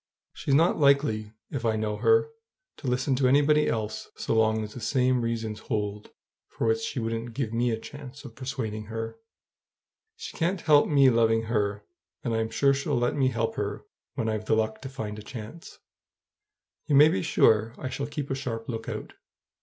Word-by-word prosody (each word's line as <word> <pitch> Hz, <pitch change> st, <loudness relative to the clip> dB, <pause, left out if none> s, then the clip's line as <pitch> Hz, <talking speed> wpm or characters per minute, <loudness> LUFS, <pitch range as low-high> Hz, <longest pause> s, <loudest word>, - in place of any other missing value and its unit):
She's 135 Hz, -, 0 dB
not 165 Hz, +4 st, +3 dB
likely, 140 Hz, -7 st, +3 dB, 0.2 s
if 135 Hz, -4 st, -3 dB
I 110 Hz, -1 st, +2 dB
know 110 Hz, -1 st, -2 dB
her, 455 Hz, 0 st, +3 dB, 0.5 s
to 140 Hz, -, -7 dB
listen 125 Hz, +2 st, +1 dB
to 130 Hz, -1 st, +3 dB
anybody 145 Hz, +3 st, +4 dB
else 110 Hz, -1 st, -3 dB
so -, -, -2 dB
long 110 Hz, -1 st, +2 dB
as 105 Hz, 0 st, -7 dB
the -, -, -7 dB
same 125 Hz, +2 st, +2 dB
reasons 115 Hz, -2 st, -3 dB
hold 105 Hz, -1 st, -3 dB, 0.4 s
for -, -, -4 dB
which 115 Hz, 0 st, +2 dB
she 115 Hz, -, -3 dB
wouldn't 115 Hz, 0 st, -3 dB
give 120 Hz, -5 st, -2 dB
me 120 Hz, +1 st, +1 dB
a 110 Hz, -, 0 dB
chance 145 Hz, +2 st, -10 dB
of 120 Hz, -, -9 dB
persuading 120 Hz, -5 st, -4 dB
her. 115 Hz, -, -5 dB, 1.0 s
She 455 Hz, -, -8 dB
can't 180 Hz, +1 st, 0 dB
help 150 Hz, -2 st, +5 dB
me 140 Hz, -3 st, +5 dB
loving 115 Hz, -1 st, +3 dB
her, 105 Hz, -2 st, -1 dB, 0.4 s
and 120 Hz, -, -1 dB
I'm 110 Hz, 0 st, 0 dB
sure 125 Hz, +5 st, +3 dB
she'll 140 Hz, 0 st, -1 dB
let 120 Hz, 0 st, +1 dB
me 135 Hz, -2 st, +2 dB
help 115 Hz, -3 st, -1 dB
her -, -, -3 dB, 0.3 s
when 115 Hz, -, -1 dB
I've 110 Hz, -1 st, -2 dB
the 110 Hz, -, +2 dB
luck 110 Hz, 0 st, -1 dB
to 135 Hz, -, -6 dB
find 105 Hz, -5 st, -5 dB
a -, -, -8 dB
chance. 115 Hz, +8 st, -9 dB, 1.1 s
You 145 Hz, -, +2 dB
may 145 Hz, +2 st, +9 dB
be 175 Hz, -, 0 dB
sure 115 Hz, -8 st, +3 dB
I 130 Hz, -, -4 dB
shall 140 Hz, +2 st, -3 dB
keep 145 Hz, -1 st, -5 dB
a -, -, +2 dB
sharp 115 Hz, -4 st, -4 dB
lookout. 115 Hz, -2 st, -5 dB
115 Hz, 190 wpm, -27 LUFS, 110-140 Hz, 1.1 s, may